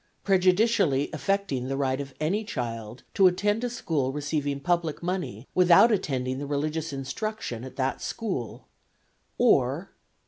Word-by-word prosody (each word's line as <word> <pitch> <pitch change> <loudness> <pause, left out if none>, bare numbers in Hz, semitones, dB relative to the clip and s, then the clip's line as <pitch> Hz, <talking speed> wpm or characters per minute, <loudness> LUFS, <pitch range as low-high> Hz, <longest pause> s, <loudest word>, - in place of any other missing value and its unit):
Prejudicially 185 - +3
affecting 155 -5 -1
the 135 0 -2
right 135 0 0
of 135 -2 -9
any 190 +8 0
child 115 - -5
to 195 - +6
attend 205 +5 +1
a 245 - 0
school 155 - -1
receiving 145 -1 -2
public 170 +1 -1
money 175 - -3
without 180 +5 +6
attending 130 - -1
the 145 - -5
religious 155 +2 -2
instruction 140 - -4
at 130 - -9
that 135 0 -1
school; 180 - -4 0.7
or - - +2
"(5.) - - -40
150 Hz, 140 wpm, -27 LUFS, 135-185 Hz, 0.7 s, to